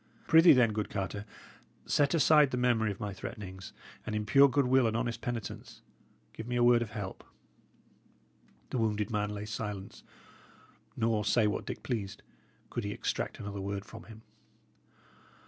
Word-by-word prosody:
Prithee, 165 +2 +7
then, 120 -5 +4
good 105 -1 -2
Carter, 100 +1 -4 0.6
set 145 +1 +2
aside 150 -2 +5
the 125 - -3
memory 120 -3 +2
of 100 - -5
my 105 -3 -4
threatenings, 95 -1 -8 0.3
and 110 - -4
in 105 0 -2
pure 140 +5 +6
goodwill 130 -2 +3
and 110 0 0
honest 120 0 -3
penitence 115 -5 -6 0.5
give 110 - -8
me 125 - -2
a 120 - +3
word 120 -1 +5
of 115 - -3
help." 105 -3 -6 1.5
The 130 - -1
wounded 105 0 0
man 105 -1 -1
lay 105 0 -5
silent; 105 -2 -6 1.0
nor, 110 -2 +1
say 110 +2 +3
what 105 - -2
Dick - - -6
pleased, 105 -6 -4 0.5
could 120 - -3
he 100 - -3
extract - - -3
another 100 -1 -5
word 100 +1 -4
from 115 0 -11
him. 110 0 -13
110 Hz, 160 wpm, -31 LUFS, 105-120 Hz, 1.5 s, Prithee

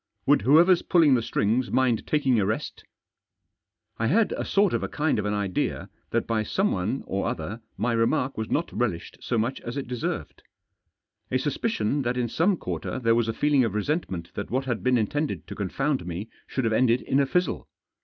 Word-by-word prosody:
Would - - +4
whoever's 165 - +5
pulling 160 -6 +4
the 125 - +3
strings 115 +3 0
mind 130 -4 +1
taking 135 -6 +2
a 100 - +2
rest? 110 - -3 0.6
" - - -53
I 115 - +1
had 215 - +3
a - - -2
sort 200 -2 +2
of - - 0
a - - -2
kind 150 -6 0
of 105 - -2
an 105 0 0
idea 100 -3 -2 0.2
that - - 0
by 115 -2 0
someone 110 - -1
or 100 - -2
other 100 +9 -4 0.2
my 120 0 0
remark 115 +3 +1
was 110 0 -4
not 165 - -1
relished 110 -9 -2
so - - -1
much 120 +4 -1
as 120 +3 -6
it 135 - -4
deserved. 125 -2 -4 0.9
A 130 - +1
suspicion 145 - -1
that 125 -1 -1
in 120 -2 0
some 180 - +2
quarter - - -4
there 115 -3 +2
was 115 -1 +2
a - - +1
feeling 145 +2 +3
of 110 -4 -1
resentment 105 - -2
that 100 - -5
what 130 +3 -1
had 120 -4 -2
been 125 -1 +3
intended 145 +8 -1
to - - -7
confound 135 +7 -1
me 90 +5 -5 0.2
should 130 - -2
have 115 -1 +1
ended 120 +1 +3
in 135 - +1
a 140 - +2
fizzle. 180 +1 0
125 Hz, 205 wpm, -26 LUFS, 110-145 Hz, 0.9 s, whoever's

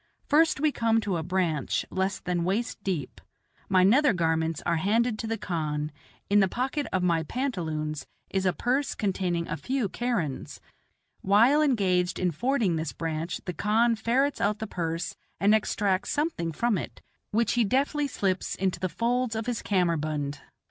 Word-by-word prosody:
First 315 0 +3
we 305 +1 +3
come 225 -3 +2
to 195 -5 -1
a - - -2
branch 170 -3 0
less 190 +1 -1
than 180 -2 -1
waist 200 +3 -2
deep. 165 -9 -3 0.5
My 185 -1 +5
nether 255 +7 +5
garments 160 -2 0
are 170 - +2
handed 220 +5 +1
to 225 - -3
the 225 0 -1
khan; 150 -5 -2 0.4
in 205 +1 +4
the 195 - +4
pocket 265 +8 -2
of 185 -1 0
my 170 -2 +2
pantaloons 160 - -3 0.2
is 190 -1 +1
a - - +4
purse 260 +8 0
containing 180 -4 -1
a - - -2
few 260 -4 -1
kerans. 210 - -2 0.6
While 230 +10 +5
engaged 190 -10 +2
in 180 -1 +1
fording 225 - +1
this 160 -1 -3
branch 165 +2 -3
the 180 - -3
khan 225 +5 +2
ferrets 250 +6 +1
out 210 +1 +1
the 220 - -4
purse 165 -4 -3 0.2
and 205 +2 +4
extracts 205 -3 +1
something 295 - -1
from 215 +4 +1
it, - - -8 0.3
which 225 0 +1
he 240 - +3
deftly 280 +6 +1
slips 195 -7 -1
into 190 -2 -1
the 185 +1 -1
folds 240 +3 0
of 220 0 -2
his 245 -3 -2
kammerbund. 155 -6 0
195 Hz, 170 wpm, -27 LUFS, 170-235 Hz, 0.6 s, My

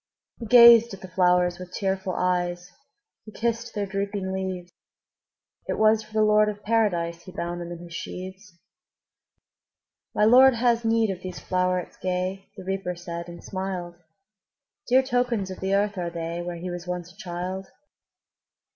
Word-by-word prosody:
'' - - -43
He 230 - -6
gazed 235 -2 +8
at 195 - -18
the 190 - -8
flowers 180 -1 +2
with 180 0 -9
tearful 190 -1 -1
eyes, 180 0 -1 0.5
He 215 - -12
kissed 235 +1 -2
their 205 -1 -1
drooping 195 -1 -3
leaves; 185 -2 -4 1.0
It - - -2
was 220 0 +4
for 215 0 -16
the 215 0 +3
Lord 210 0 +4
of 205 -1 -7
Paradise 175 -7 0
He 185 - -12
bound 175 0 -4
them 175 0 -6
in 175 - -6
his 170 -1 -11
sheaves. 185 +1 -8 1.6
``My 210 - +4
Lord 260 +2 +7
has 235 0 +2
need 225 -2 +2
of 185 -1 -7
these 185 -1 -7
flowerets 180 -1 -1
gay,'' 185 +1 -2
The - - -8
Reaper 190 -1 -3
said, 170 0 -7
and 170 0 -10
smiled; 185 -2 -4 1.0
``Dear 260 +1 +5
tokens 245 -6 0
of 185 - -8
the 190 +1 0
earth 205 -1 0
are 175 -1 -2
they, 170 0 -4
Where 175 0 -5
he 180 +1 -5
was 175 0 -7
once 180 -1 -4
a - - -27
child. 185 +1 -5
190 Hz, 170 wpm, -25 LUFS, 180-215 Hz, 1.6 s, gazed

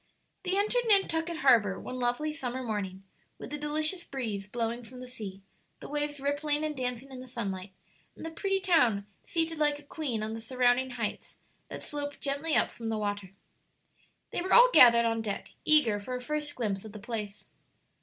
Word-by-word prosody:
They 375 +1 -1
entered 455 +4 +1
Nantucket 340 -5 +3
harbor 210 -7 +5
one 255 - -6
lovely 250 +5 0
summer 260 -3 -4
morning, 195 -4 -4 0.3
with 285 - -8
a - - -2
delicious 310 +4 0
breeze 220 - -4
blowing 230 +2 -2
from 250 +2 -12
the 255 - -8
sea, 205 -6 -8 0.4
the - - -9
waves 295 0 -2
rippling 290 +2 0
and 305 -1 -1
dancing 250 0 -3
in 260 - -8
the 255 - -9
sunlight, 200 -6 -4 0.4
and - - -9
the 325 - -5
pretty 390 +3 -1
town 250 - +3 0.2
seated 325 -1 -1
like 295 -1 +2
a 295 - -15
queen 280 -7 -3
on 220 +1 -3
the 225 - -6
surrounding 250 +2 +2
heights 245 - -4 0.3
that - - -6
slope 290 -1 -4
gently 285 +3 -1
up - - +3
from 230 -1 -6
the 220 - -1
water. 205 -2 -3 1.0
They - - -2
were 370 +1 0
all - - +8
gathered 235 -1 +8
on 225 -1 0
deck, 205 -3 -5
eager 275 -10 +6
for 250 +5 -5
a - - -3
first 300 +3 -3
glimpse 205 -5 -2
of 215 -2 -10
the 215 - -8
place. 210 -2 -5
255 Hz, 190 wpm, -29 LUFS, 225-300 Hz, 1.0 s, all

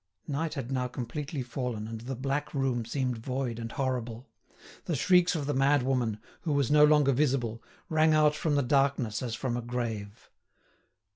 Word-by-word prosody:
Night 155 +2 -2
had 135 -3 -5
now 130 -1 0
completely 130 +3 -4
fallen, 120 -3 -4
and 115 0 -6
the 130 +3 -5
black 140 +4 -2
room 130 -4 0
seemed 125 -1 -2
void 125 -1 -3
and 115 0 -5
horrible. 125 -2 -3 0.6
The 165 - -1
shrieks 180 +5 +4
of 150 -3 -2
the 145 - -1
madwoman, 130 -5 +2 0.2
who 160 -4 -1
was 140 -1 +1
no 150 0 +7
longer 150 -2 +5
visible, 125 -5 0 0.3
rang 155 0 +3
out 150 -1 +5
from 150 0 0
the 140 - +2
darkness 130 -4 +1
as 120 -3 -3
from 120 +1 -2
a 120 - -2
grave. 115 -4 -5
130 Hz, 170 wpm, -29 LUFS, 120-145 Hz, 0.6 s, no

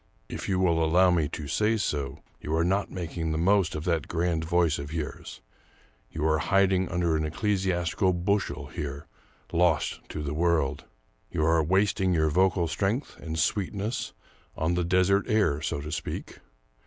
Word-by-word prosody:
If - - -5
you 95 - +1
will 85 -3 +2
allow 90 +3 +4
me 80 -4 +2
to 75 -2 -6
say 105 +9 +1
so, 70 -7 -2 0.2
you 75 - -2
are 80 - +2
not 95 +3 +1
making 85 -2 -4
the 80 - -1
most 90 -1 +2
of 75 - -4
that 85 -2 0
grand 85 -1 0
voice 85 -2 +2
of 70 +1 -6
yours; 80 -4 -6 0.7
you 75 0 -3
are 80 -1 +3
hid 100 0 +3
den 95 -1 +1
under 85 -2 +1
an 80 - 0
ecclesiastical 90 +1 0
bushel 90 -5 -1
here 70 -1 -6 0.2
— - - -33
lost 85 -3 +2
to 75 - -5
the 70 0 -3
world. 80 -3 +1 0.4
You 80 - 0
are 80 0 +4
wasting 95 +1 +2
your 80 -1 +2
vocal 90 0 +2
strength 100 - -2
and 80 -1 -5
sweetness 100 +5 -1 0.4
on 80 +2 0
the 90 0 0
desert 95 +3 +3
air, 95 -9 +2
so 70 - -2
to 75 +2 -6
speak. 80 - -5
85 Hz, 175 wpm, -27 LUFS, 80-95 Hz, 0.7 s, allow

